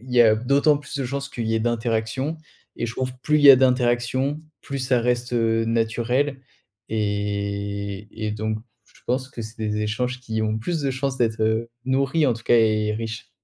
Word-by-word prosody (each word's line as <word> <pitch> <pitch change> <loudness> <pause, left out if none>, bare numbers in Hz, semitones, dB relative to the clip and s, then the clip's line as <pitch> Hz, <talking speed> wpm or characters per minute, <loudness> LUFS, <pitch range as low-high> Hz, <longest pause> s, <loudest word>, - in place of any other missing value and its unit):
il 125 +1 -10
y 120 - +6
a 110 -2 +6
d'autant 140 +6 +3
plus 145 0 -8
de 135 - -1
chances 140 +2 -3
qu'il 115 -4 -4
y 110 - +1
ait - - 0
d'interactions 120 +5 -1 0.4
et 120 - -2
je 115 - -5
trouve 130 +1 -2
plus 150 - +3
il 145 - 0
y 140 - +11
a 135 - +10
d'interactions, 125 +2 +1 0.2
plus 140 0 -4
ça 125 -1 +1
reste, 125 +1 -1
heu, 115 -1 +2
naturel. 120 +5 0 0.5
Et 100 -1 -2 0.2
et - - -1
donc 110 0 -2 0.3
je - - -24
pense 130 +2 -1
que 120 - -7
c'est 110 +1 -10
des 105 -1 -1
échanges 125 +4 -2
qui 110 -3 -3
ont 110 0 0
plus 165 +8 -2
de 135 - 0
chances 130 0 -2
d'être, 115 -3 0
heu, 110 +1 +1 0.2
nourris 135 +4 +2
en 125 - +3
tout 115 - -11
cas - - +4
et 110 -1 +3
riches. 110 0 -5
120 Hz, 205 wpm, -23 LUFS, 110-130 Hz, 0.5 s, y